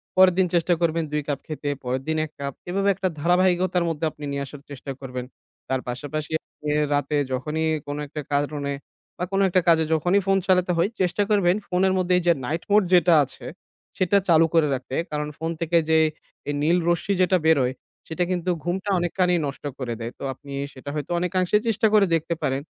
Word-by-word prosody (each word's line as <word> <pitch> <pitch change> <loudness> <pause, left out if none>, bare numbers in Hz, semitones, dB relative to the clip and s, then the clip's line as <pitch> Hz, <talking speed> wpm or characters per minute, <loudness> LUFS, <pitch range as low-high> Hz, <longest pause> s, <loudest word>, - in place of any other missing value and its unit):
পরের 185 -1 +6
দিন 185 - +4
চেষ্টা 175 +1 +3
করবেন 165 -1 +1
২ 150 0 0
কাপ 145 -2 -1
খেতে। 150 -2 -4
পরের 130 +1 -2
দিন 160 0 0
১ 155 - -13
কাপ। 140 -1 -4 0.2
এভাবে 195 +2 +1
একটা 190 +1 -1
ধারাবাহিকতার 180 +2 +2
মধ্যে 160 0 -2
আপনি 150 - -13
নিয়ে 140 0 -2
আসার 140 +1 -11
চেষ্টা 140 0 -7
করবেন। 125 -2 -6 0.4
তার 130 -1 0
পাশাপাশি 145 +5 -4 0.6
রাতে 145 +1 0
যখনই 150 +5 -1 0.2
কোনো 145 +1 -4
একটা 150 +1 -6
কারণে 145 0 -1 0.4
বা - - -3
কোনো 195 0 +3
একটা 185 +1 +3
কাজে 165 -1 +5
যখনই 175 +5 +2
ফোন 195 0 +4
চালাতে 185 -1 +3
হয়, 170 +4 +2
চেষ্টা 185 +3 +1
করবেন 190 -4 +3
ফোনের 185 +1 +2
মধ্যে 180 0 +1
এই 180 - -1
যে 170 - +7
নাইট 160 +6 -2
মোড 210 0 +6
যেটা 175 -1 +6
আছে 135 - -10 0.5
সেটা 185 +2 +3
চালু 165 -1 +6
করে 165 -2 +4
রাখতে। 130 0 -4 0.2
কারণ 150 0 -2
ফোন 165 +1 -3
থেকে 170 +1 +2
যে 160 - +5 0.5
এই - - 0
নীল 165 +4 +3
রশ্মি 175 +3 +1
যেটা 185 0 +4
বেরোয় 135 -6 +3 0.3
সেটা 165 +2 -1
কিন্তু 180 0 -1
ঘুমটা 190 +3 -2
অনেকখানি 180 +1 +1
নষ্ট 140 - -7 0.2
করে 125 -3 -3
দেয়। 115 +1 -4
তো - - -8
আপনি 140 +2 -14 0.2
সেটা 135 +2 -9
হয়তো 150 +2 -4
অনেকাংশে 185 +2 +1
চেষ্টা 220 0 +3
করে 210 -2 +6
দেখতে 165 +1 -1
পারেন। 135 +1 0
165 Hz, 195 wpm, -24 LUFS, 145-180 Hz, 0.6 s, যে